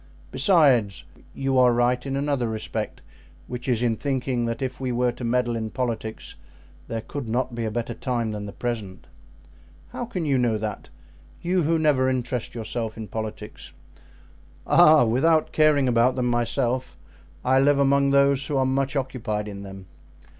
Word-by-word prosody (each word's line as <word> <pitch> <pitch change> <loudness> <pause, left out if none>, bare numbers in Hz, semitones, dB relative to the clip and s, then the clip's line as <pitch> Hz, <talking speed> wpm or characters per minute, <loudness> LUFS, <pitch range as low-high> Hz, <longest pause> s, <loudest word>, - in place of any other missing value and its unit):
Besides, 135 - +3 0.3
you 135 -1 +1
are 125 -1 +6
right 120 +1 +1
in 135 - -2
another 140 -3 0
respect, 110 -1 -4 0.4
which 125 +1 -7
is 120 -2 +1
in 115 -2 +2
thinking 130 -3 -1
that 115 0 -3
if 130 -1 -4
we 130 -1 -2
were 125 0 +1
to 120 - -10
meddle 120 0 0
in 110 -1 -3
politics 115 -3 -4 0.5
there 115 -1 -3
could 135 +2 -6
not 125 +2 -1
be 115 -1 -3
a - - -1
better 120 +1 -3
time 120 -2 -2
than 105 -1 -5
the - - -7
present." 110 -7 -5 0.8
"How 245 - -5
can 185 -8 -4
you 135 -3 +2
know 120 -3 +1
that? 105 -1 -5 0.5
You 180 +1 +1
who 165 +1 +2
never 145 -5 +2
interest 125 -2 -3
yourself 115 -1 -4
in 110 -3 -7
politics?" 110 0 -7 0.9
"Ah! 155 -3 +6
without 155 +8 +2
caring 150 -3 +3
about 120 +1 +3
them 125 -1 -1
myself, 120 -1 -1 0.5
I 130 +1 +4
live 140 +1 +4
among 140 0 +3
those 140 0 +3
who 145 - -1
are 130 - +2
much 135 +1 0
occupied 115 -6 -2
in 100 -1 -7
them. 95 -1 -10
125 Hz, 170 wpm, -24 LUFS, 115-135 Hz, 0.9 s, are